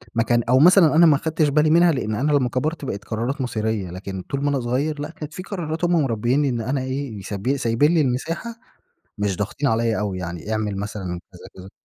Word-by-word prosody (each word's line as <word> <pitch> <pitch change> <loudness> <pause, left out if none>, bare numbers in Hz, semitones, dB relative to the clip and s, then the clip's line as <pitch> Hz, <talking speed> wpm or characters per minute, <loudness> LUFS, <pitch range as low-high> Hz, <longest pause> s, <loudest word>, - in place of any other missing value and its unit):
ما 115 - +3
كان 120 0 +1
أو 130 - +5
مثلًا 170 0 +6
أنا 170 +1 +7
ما 155 - +6
أخدتش 155 +1 0
بالي 150 +2 +3
منها 170 +2 +5
لأن 110 -7 -2
أنا 140 +7 0
لمّا 130 -4 +2
كَبرت 150 +5 -2
بقيت 100 -5 -5
قرارات 120 +6 -3
مصيرية، 110 -5 -2
لكن 95 +1 -6
طول 140 +9 -4
ما 145 - +2
أنا 140 - 0
صغيّر 140 +5 -1
لأ، 145 - -4
كانت 155 -2 -9
في 185 - -7
قرارات 170 -4 -3
هم 175 -2 +3
مربيني 130 +3 +1
إن 120 -2 -2
أنا 130 +4 -1
إيه؟ 130 -5 -4
ساب 105 +8 -2
سايبين 135 +5 +2
لي 165 - +4
المساحة 150 - -2 0.7
مش 100 -3 -1
ضاغطين 120 +7 -2
عليَّ 115 0 +1
أوي 100 -3 -2
يعني، 85 +3 -5
اعمل 105 -2 -1
مثلًا 100 0 -5 0.3
كذا 90 - -12
كذا. 95 +1 -11
130 Hz, 220 wpm, -22 LUFS, 110-150 Hz, 0.7 s, أنا